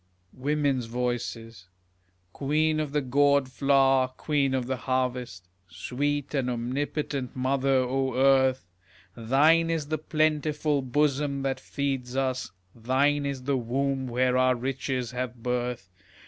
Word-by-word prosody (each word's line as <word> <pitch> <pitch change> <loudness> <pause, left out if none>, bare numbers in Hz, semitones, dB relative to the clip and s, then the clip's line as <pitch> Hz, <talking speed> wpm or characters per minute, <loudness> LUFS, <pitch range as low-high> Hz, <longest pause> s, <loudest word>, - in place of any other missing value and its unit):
Women's 140 -2 0
Voices 115 -4 -4 0.7
Queen 155 +2 +1
of 150 -2 -2
the 150 0 +1
gourd 140 +1 +2
flower, 135 0 +3
queen 135 +1 -1
of 130 -2 -1
the 130 +1 -2
harvest, 125 -7 -2 0.2
Sweet 145 - -3
and 135 -3 0
omnipotent 130 +2 -3
mother, 135 +1 0
O 130 0 0
Earth! 130 -2 +3 0.5
Thine 150 +8 +3
is 160 -3 -2
the 155 -1 -1
plentiful 155 -1 0
bosom 140 +1 0
that 135 -1 -1
feeds 135 -2 -3
us, 130 -2 -1 0.2
Thine 140 +5 +1
is 135 -2 -4
the 140 +1 0
womb 130 +2 -1
where 125 +1 +1
our 130 0 +3
riches 130 -1 -3
have 125 -2 -5
birth. 125 -4 -2
130 Hz, 125 wpm, -27 LUFS, 125-145 Hz, 0.7 s, flower